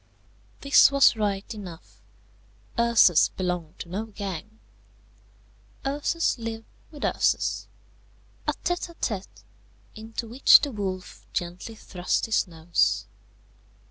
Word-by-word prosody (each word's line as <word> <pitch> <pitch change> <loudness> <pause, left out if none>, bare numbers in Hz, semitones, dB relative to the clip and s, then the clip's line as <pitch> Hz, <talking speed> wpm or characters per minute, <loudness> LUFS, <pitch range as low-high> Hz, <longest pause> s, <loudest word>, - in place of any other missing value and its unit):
This 280 0 +6
was 275 -3 +5
right 205 -2 -1
enough. 185 -6 -11 0.8
Ursus 235 -8 +5
belonged 180 -4 -4
to 170 - -8
no 200 +5 -3
gang. 205 0 -7 1.3
Ursus 290 +1 0
lived 225 -1 -5 0.2
with 295 -2 -5
Ursus, - - 0 0.8
a - - +2
tête 350 0 -3
à - - -18
tête, 200 - -4 0.5
into 225 +2 -6
which 245 +5 +7
the 285 -1 -2
wolf 190 -4 -5
gently 175 +6 -4
thrust 180 -4 -2
his 220 -2 +1
nose. 165 0 0
215 Hz, 110 wpm, -26 LUFS, 180-235 Hz, 1.3 s, which